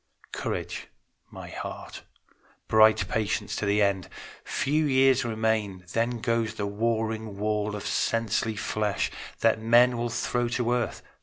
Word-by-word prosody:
Courage, - - -4 0.4
my - - -9
heart: - - -7 0.7
bright 110 -3 +5
patience 105 0 -1
to 105 - -2
the 105 +1 +3
end! 100 -2 0 0.3
Few 150 +3 0
years 135 -2 +4
remain; 110 -5 -1
then 115 0 0
goes 115 -2 0
the 105 - -2
warring 110 0 -2
wall 105 0 -1
Of 105 - -6
sensely 115 -1 0
flesh, 105 -1 -1 0.3
that 110 -1 +3
men 120 +2 +5
will 120 0 -1
throw 120 +1 -1
to 120 0 -1
earth. 120 -2 -2
110 Hz, 135 wpm, -27 LUFS, 105-120 Hz, 0.7 s, bright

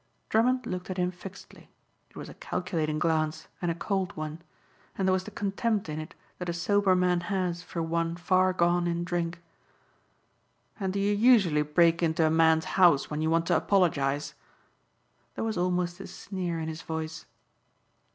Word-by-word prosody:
Drummond 250 +3 +2
looked 180 -5 -5
at 185 - -4
him 180 0 +1
fixedly. 185 +2 -12 0.4
It - - -28
was - - -7
a - - -10
calculating 165 -4 -2
glance 160 -1 0
and 175 - 0
a 165 - -1
cold 190 -1 -2
one. 155 +1 -5 0.6
And 190 - 0
there 185 - +4
was 185 0 -1
the - - -6
contempt 205 +1 -1
in 155 0 -4
it 155 +4 -8 0.2
that 180 -1 -4
a - - -1
sober 190 +2 +2
man 180 -1 +2
has 180 -1 -2
for 170 -1 -4
one 165 +1 -1
far 185 +1 +2
gone 175 -1 +2
in 170 0 -1
drink. 170 0 -2 1.4
"And 190 -2 -1
do 200 - -2
you 200 +1 +2
usually 205 -9 +4
break 165 +3 +3
into 160 -1 +2
a 155 - +2
man's 160 0 +4 0.2
house 165 -7 +5
when 150 +1 -2
you 160 - +1
want 165 +1 +2
to 175 - +2
apologize?" 150 -7 +1 1.0
There - - -3
was 225 -1 -1
almost 180 0 -1
a 195 - -7
sneer 180 -4 -4
in 160 - -3
his 160 0 -5
voice. 160 0 -5
175 Hz, 180 wpm, -28 LUFS, 160-185 Hz, 1.4 s, house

